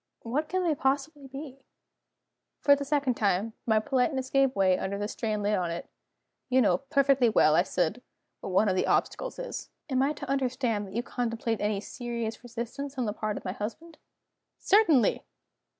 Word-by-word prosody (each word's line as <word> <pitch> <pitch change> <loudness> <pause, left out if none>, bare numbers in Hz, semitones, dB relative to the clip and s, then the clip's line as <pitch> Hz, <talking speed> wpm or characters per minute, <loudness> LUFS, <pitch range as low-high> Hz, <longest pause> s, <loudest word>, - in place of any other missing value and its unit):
"What 285 +7 -2
can 370 0 0
they 335 -3 +2
possibly 280 +1 -1
be?" 270 0 -9 1.0
For 285 - +6
the 280 - -4
second 280 -2 +1
time, 210 0 0
my 220 -1 +4
politeness 260 +3 0
gave 270 -1 +3
way 190 -2 +4
under 190 +2 -3
the 205 +1 -2
strain 215 -2 -2
laid 205 0 +2
on 180 -2 -1
it. 170 +1 -5 0.6
"You 260 0 +4
know 185 -7 +3
perfectly 275 -3 +3
well," 155 -8 +4
I 165 - +5
said, 185 +4 -1 0.4
"what - - -6
one 190 +3 +3
of 190 - +2
the 185 - +1
obstacles - - 0
is." - - -6 0.2
"Am 260 0 +2
I 280 +3 +2
to - - -8
understand 255 -6 0
that 190 - -11
you 235 - 0
contemplate 230 -2 -2
any 205 -1 0
serious 235 -1 -5
resistance 245 +4 -6
on 250 - 0
the 210 - -1
part 215 -1 -3
of - - -9
my 185 - -1
husband?" 230 - -7 0.6
"Certainly!" 335 - +4
240 Hz, 180 wpm, -28 LUFS, 210-275 Hz, 1.0 s, For